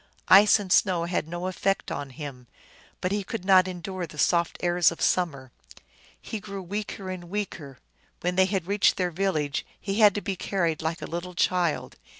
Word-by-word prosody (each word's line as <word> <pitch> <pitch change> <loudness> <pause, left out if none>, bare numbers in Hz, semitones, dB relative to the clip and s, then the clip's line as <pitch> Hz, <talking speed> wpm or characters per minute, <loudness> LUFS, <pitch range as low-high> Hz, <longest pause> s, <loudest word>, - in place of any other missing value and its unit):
Ice 205 +3 +8
and 195 -3 -1
snow 180 -4 +3
had 170 -2 -2
no 175 +2 -5
effect 190 +1 -1
on 140 - -4
him, 130 -3 -9 0.5
but 185 - -1
he 205 0 -1
could 190 -1 -6
not 185 -1 +6
endure 185 0 -5
the 155 - -13
soft 170 +3 +2
airs 175 -1 +4
of 170 - -9
summer. 140 -8 0 0.7
He 220 - -6
grew 195 -1 -7
weaker 200 0 -5
and 180 -2 -7
weaker; 170 -8 -5 0.4
when 180 +1 -1
they 190 0 +4
had 190 -3 -1
reached 200 +2 +2
their 180 -2 0
village 155 -6 -1 0.2
he 200 +2 -3
had 210 -3 +6
to 205 - -2
be 195 - -3
carried 170 -5 -1
like 160 +1 -3
a - - -3
little 175 +2 -6
child. 175 -3 0
180 Hz, 185 wpm, -26 LUFS, 170-195 Hz, 0.7 s, Ice